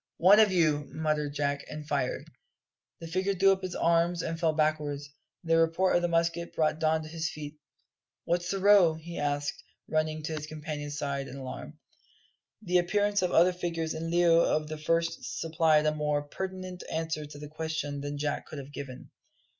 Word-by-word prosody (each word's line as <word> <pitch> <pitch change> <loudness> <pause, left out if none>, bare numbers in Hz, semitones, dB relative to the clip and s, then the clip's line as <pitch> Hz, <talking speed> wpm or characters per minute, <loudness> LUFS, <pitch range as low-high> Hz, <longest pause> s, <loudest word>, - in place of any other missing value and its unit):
"One 200 +5 +7
for 210 - +1
you," 155 -5 +2
muttered 150 -2 -1
Jack, 140 -1 -1
and 150 -1 -7
fired. 140 -4 -1 0.7
The 165 - -7
figure 185 +4 0
threw 195 +1 +5
up 190 0 0
its 185 -1 -4
arms 170 0 +2
and 165 0 -3
fell 165 -2 +3
backwards. 150 -2 0 0.4
The 165 -1 +3
report 165 +3 +2
of 175 - +3
the 175 - +1
musket 170 0 0
brought 155 0 +1
Don 160 0 +1
to - - -8
his 160 0 -3
feet. 150 -1 -8 0.7
"What's 175 +1 0
the 195 - 0
row?" 195 -4 +6
he 170 +2 -7
asked, 145 0 -2 0.2
running 155 0 -1
to 160 - -3
his 150 -1 -5
companion's 150 -1 -5
side 140 -2 -2
in 130 - -9
alarm. 130 -1 -7 0.9
The 180 0 +3
appearance 205 +3 +1
of 180 - +1
other 180 +2 +5
figures 165 -2 -3
in 160 +1 -4
lieu 170 -1 +5
of 155 -2 +1
the 155 - -4
first 165 +2 -1
supplied 160 -2 +3
a 155 - +3
more 150 -1 0
pertinent 185 +3 -6
answer 160 -2 -2
to 145 0 -11
this 145 0 -8
question 155 -3 -3
than 145 0 -4
Jack 145 0 -2
could 155 - -8
have 140 +1 -9
given. 130 -3 -8
160 Hz, 185 wpm, -29 LUFS, 150-170 Hz, 0.9 s, One